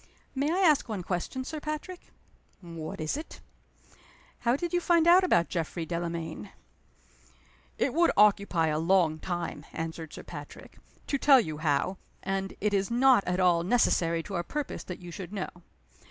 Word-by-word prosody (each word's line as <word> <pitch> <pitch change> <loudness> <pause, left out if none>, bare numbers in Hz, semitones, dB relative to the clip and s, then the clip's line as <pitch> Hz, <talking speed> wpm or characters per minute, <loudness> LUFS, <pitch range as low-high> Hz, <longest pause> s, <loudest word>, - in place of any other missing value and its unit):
"May 285 +3 0
I 370 +3 +1
ask 295 -5 +3
one 205 -5 -3
question, 185 +9 -3
Sir 310 +3 -5
Patrick?" 305 +4 -6 0.5
"What 165 -4 -7
is 155 0 -2
it?" 310 +2 -8 1.0
"How 240 +1 +2
did 345 +4 -4
you 350 - +2
find 340 -2 +3
out 360 +2 +7
about 170 - +3
Geoffrey 165 -1 -3
Delamayn?" 170 -7 -4 1.3
"It 255 - 0
would 340 +3 +4
occupy 200 -5 +4
a 155 0 0
long 165 -2 +2
time," 175 0 -4
answered 160 -1 -5
Sir - - -9
Patrick, - - -11 0.3
"to 280 - -1
tell 275 -2 +7
you 155 -9 -3
how 155 +4 0 0.3
and 195 0 -3
it 210 0 +1
is 195 -1 +1
not 245 -2 +5
at 180 +1 -1
all 175 -2 +4
necessary 170 -5 +2
to 200 - -9
our 175 -2 -1
purpose 295 - -4
that 180 0 -7
you 175 - -8
should 185 +1 -8
know. 200 -2 -3
190 Hz, 170 wpm, -28 LUFS, 170-270 Hz, 1.3 s, out